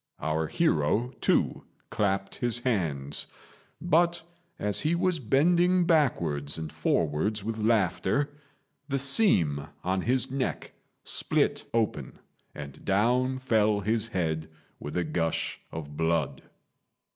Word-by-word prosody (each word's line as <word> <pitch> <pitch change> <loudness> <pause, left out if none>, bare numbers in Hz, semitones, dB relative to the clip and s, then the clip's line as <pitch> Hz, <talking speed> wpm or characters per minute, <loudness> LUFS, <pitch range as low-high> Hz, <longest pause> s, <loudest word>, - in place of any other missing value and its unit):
Our 80 +1 -1
hero, 105 - +1
too, - - +1 0.3
clapped 95 -1 -1
his 120 -1 +1
hands; 80 - -2 0.5
but, 170 0 +2 0.3
as 105 0 -1
he 160 +3 +1
was 180 -1 +1
bending 175 +8 +3
backwards 85 - +1
and 80 -1 -6
forwards 85 +7 0
with 110 +1 -3
laughter, 110 - +1 0.6
the 140 -2 0
seam 130 - +3 0.2
on 95 +1 0
his 130 +4 0
neck 135 -1 -3 0.3
split - - 0
open, 115 -2 -1 0.4
and 70 -1 -9
down 125 +6 +2
fell 110 -5 +2
his 110 +2 0
head 80 -6 -2 0.3
with 75 +4 -5
a 90 - +1
gush 80 +1 -2
of 75 -2 -7
blood. 80 -2 0
105 Hz, 115 wpm, -28 LUFS, 80-130 Hz, 0.6 s, bending